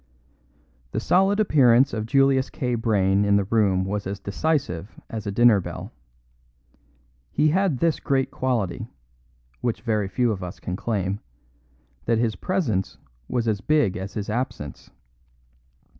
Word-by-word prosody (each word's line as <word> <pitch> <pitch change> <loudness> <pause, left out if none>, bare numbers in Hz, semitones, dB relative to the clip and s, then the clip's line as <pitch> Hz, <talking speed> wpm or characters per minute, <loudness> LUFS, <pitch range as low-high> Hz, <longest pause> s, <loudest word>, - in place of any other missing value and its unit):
The - - 0
solid 195 +3 +3
appearance 135 - +4
of 110 0 -3
Julius 135 0 +3
K. 125 -2 -2
Brayne 100 -4 +2
in 100 0 +3
the 100 - +3
room 95 -3 +2
was 100 0 -3
as 100 +1 -4
decisive 100 - -2
as 110 -2 -5
a - - -1
dinner 115 0 +5
bell. 90 - -7 1.4
He 150 +2 +3
had 185 -3 +1
this 165 +3 +1
great 135 -1 0
quality, 115 -9 -2 0.7
which 120 -2 -2
very 110 -4 0
few 120 +3 +1
of 100 -3 -4
us 90 0 -7
can 90 - -4
claim, 100 -2 -2 0.9
that 115 0 +2
his 115 -2 0
presence 115 - -1 0.3
was 120 -2 -1
as 105 -3 0
big 150 -11 +2
as 95 +1 -6
his 105 -2 -3
absence. 105 - -4
110 Hz, 145 wpm, -24 LUFS, 100-130 Hz, 1.4 s, dinner